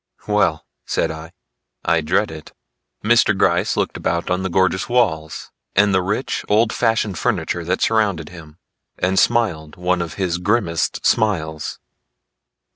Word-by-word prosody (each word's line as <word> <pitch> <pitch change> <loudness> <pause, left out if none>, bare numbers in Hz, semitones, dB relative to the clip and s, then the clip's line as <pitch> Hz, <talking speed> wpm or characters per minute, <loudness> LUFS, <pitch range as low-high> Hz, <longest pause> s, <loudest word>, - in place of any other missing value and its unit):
"Well," 95 -7 +1 0.2
said - - -1
I, 80 +1 -9 0.5
"I 85 -1 +2
dread 90 +5 +1
it." 80 -2 -10 0.5
Mr. - - +4
Gryce - - +2
looked - - -1
about 85 +1 -2
on 90 +1 +1
the 95 - -2
gorgeous 95 +2 +1
walls 90 -11 0 0.2
and 100 0 +4
the 95 - +3
rich 90 - -2
old 110 +2 +3
fashioned 110 -6 0
furniture 85 - -1
that 90 +2 -1
surrounded 100 -8 +1
him, 80 -3 -13 0.4
and 95 +1 +1
smiled 90 -11 +1
one 90 0 0
of 85 -2 -5
his 90 -3 -1
grimmest 90 -4 0
smiles. 80 -9 0
90 Hz, 140 wpm, -20 LUFS, 80-105 Hz, 0.5 s, Mr